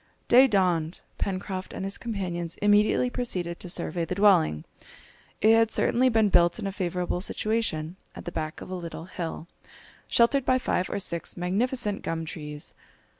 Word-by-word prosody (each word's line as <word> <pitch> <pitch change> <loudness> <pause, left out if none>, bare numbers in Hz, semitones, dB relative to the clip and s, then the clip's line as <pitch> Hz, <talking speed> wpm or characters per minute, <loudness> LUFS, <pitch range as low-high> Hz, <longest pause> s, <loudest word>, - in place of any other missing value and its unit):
Day 255 +3 +7
dawned; 180 -6 +1 0.2
Pencroft 190 -1 -3
and 190 - -4
his 195 - -3
companions 175 -7 -3
immediately 210 +4 +3
proceeded 180 -9 -3
to 180 - -7
survey 170 0 -2
the 180 - -3
dwelling. 180 - +3 0.8
It 220 +1 +6
had 225 -1 +4
certainly 255 +3 +3
been 220 -3 +3
built 175 -2 +4
in 220 - -5
a 195 - -1
favourable 180 -2 -2
situation, 190 -6 -1 0.2
at - - -9
the 175 - -4
back 155 -2 -4
of - - -8
a - - -3
little 170 -2 -6
hill, 170 -2 -6 0.6
sheltered 245 +3 +3
by 255 0 +3
five 185 -7 -1
or - - -2
six 170 -4 -3
magnificent 205 +4 -1
gum 165 0 -3
trees. 150 -1 -7
185 Hz, 165 wpm, -27 LUFS, 170-220 Hz, 0.8 s, Day